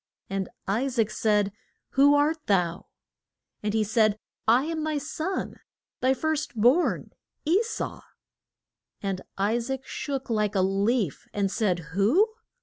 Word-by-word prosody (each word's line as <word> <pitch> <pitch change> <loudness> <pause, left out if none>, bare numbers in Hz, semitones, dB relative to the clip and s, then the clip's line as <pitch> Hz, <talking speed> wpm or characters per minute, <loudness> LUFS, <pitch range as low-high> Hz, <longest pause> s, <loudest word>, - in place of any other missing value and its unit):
And 195 -1 -2 0.2
I 220 +7 +1
saac 230 -5 0
said, 210 -2 +2 0.4
Who 285 +2 +5
art 300 +2 +1
thou? 180 -3 +1 0.7
And 210 0 -1
he 220 - +3
said, 215 0 +3 0.3
I 240 +4 +5
am 320 -1 -2
thy 310 -1 0
son, 315 +6 -3 0.4
thy 260 +1 +3
first 310 -2 -1
born, 245 +11 +3 0.3
E 350 +7 +4
sau. 460 0 -4 1.0
And 195 -2 -2 0.2
I 205 +4 +2
saac 265 +2 -4
shook 275 -1 -4
like 210 -3 0
a 190 - +3
leaf, 195 - 0
and 200 -2 +1
said, 175 -9 -1
Who? 235 - +4
230 Hz, 140 wpm, -27 LUFS, 200-290 Hz, 1.0 s, Who